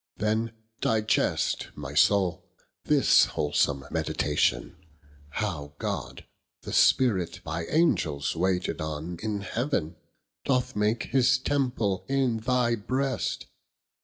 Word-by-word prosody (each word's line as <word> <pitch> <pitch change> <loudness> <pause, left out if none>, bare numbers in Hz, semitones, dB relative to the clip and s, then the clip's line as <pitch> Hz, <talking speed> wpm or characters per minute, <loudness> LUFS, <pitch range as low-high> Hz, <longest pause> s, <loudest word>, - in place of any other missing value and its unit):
then 110 +2 0 0.3
digest, 110 -1 +1
My 70 -1 -7
Soule, 90 +4 +3 0.4
this - - +5
wholsome 75 -1 0
meditation, 75 - 0 0.5
How 75 -5 -4
God - - -4 0.4
the - - -6
Spirit, 95 -10 +3
by 80 +2 -4
Angels 80 - +1
waited 90 0 -1
on 80 +3 -5
In 105 -2 -2
heaven, 105 - -2 0.5
doth 130 -1 0
make 105 +2 +1
his 130 0 +3
Temple 125 -8 -1
in 135 -4 +1
thy 120 +1 +1
brest. 130 +5 -2
105 Hz, 105 wpm, -27 LUFS, 80-125 Hz, 0.5 s, this